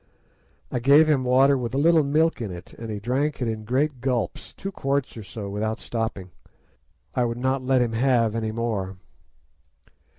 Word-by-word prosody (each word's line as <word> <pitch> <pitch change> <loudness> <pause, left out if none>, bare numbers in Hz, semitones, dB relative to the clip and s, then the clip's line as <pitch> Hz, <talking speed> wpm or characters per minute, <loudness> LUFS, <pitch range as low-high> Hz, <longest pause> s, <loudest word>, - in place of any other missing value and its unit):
"I 125 - -1
gave 140 +6 +6
him 145 -4 +2
water 130 +2 +4
with 125 -1 -3
a - - +1
little 160 +3 +5
milk 155 +1 +1
in 110 - -3
it, 90 0 -9
and 115 -1 -8
he 105 -1 -4
drank 135 +7 -1
it 125 - -1
in 110 -1 -4
great 130 +3 0
gulps, 120 -7 -2
two 195 - -6
quarts 140 -5 -1
or 115 - -7
so, 100 +1 -7
without 110 +3 -2
stopping. 110 -5 -4 0.8
I 125 - +1
would 120 0 -2
not 130 +2 0
let 130 -1 +3
him 115 -1 -2
have 115 -2 +2
any 110 -1 -2
more. 110 -5 -3
125 Hz, 185 wpm, -24 LUFS, 110-135 Hz, 0.8 s, gave